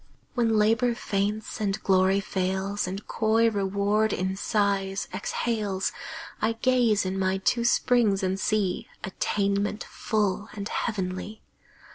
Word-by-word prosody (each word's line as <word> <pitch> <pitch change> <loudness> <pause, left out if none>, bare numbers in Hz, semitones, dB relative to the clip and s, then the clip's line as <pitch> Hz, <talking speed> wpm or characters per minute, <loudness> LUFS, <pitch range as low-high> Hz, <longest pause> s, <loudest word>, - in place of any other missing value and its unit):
When 230 -3 +2
Labor 225 +3 +3
faints, 210 +2 -2
and 200 0 0
Glory 190 0 +4
fails, 190 +1 -1
And 195 +3 -5
coy 225 +1 +2
Reward 200 +2 +1
in 190 +1 -1
sighs 200 -1 0
exhales, 210 -5 -1 0.5
I 220 +1 +2
gaze 230 -4 +2
in 190 +1 -2
my 190 0 +1
two 235 +5 +1
springs 235 -4 +3
and 190 +1 0
see 205 -3 0 0.2
Attainment 200 +2 -1
full 210 -1 -1
and 205 -1 -5
heavenly. 205 -1 -3
205 Hz, 120 wpm, -26 LUFS, 195-220 Hz, 0.5 s, Glory